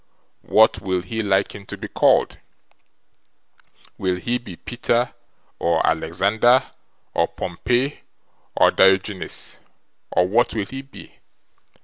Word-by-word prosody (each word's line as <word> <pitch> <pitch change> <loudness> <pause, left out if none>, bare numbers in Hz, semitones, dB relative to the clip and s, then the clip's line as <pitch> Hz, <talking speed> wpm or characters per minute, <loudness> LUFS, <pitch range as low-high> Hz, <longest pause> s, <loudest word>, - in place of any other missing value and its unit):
What 110 -2 +4
will 95 -2 -1
he 110 +4 -3
like 100 -2 +1
him 100 -1 -11
to - - -7
be - - -6
called? - - +2 1.6
Will 95 -1 0
he 120 +7 -2
be 100 -7 -10
Peter, 120 +3 -1 0.5
or - - +1
Alexander, 105 +10 +2 0.4
or 85 - +2
Pompey, 120 - -2 0.6
or - - +5
Diorgeenes, 95 0 +1 0.5
or 90 - +2
what 115 +5 +1
will 105 -3 -1
he 135 +6 -7
be?" 135 0 -13
100 Hz, 115 wpm, -22 LUFS, 95-120 Hz, 1.6 s, or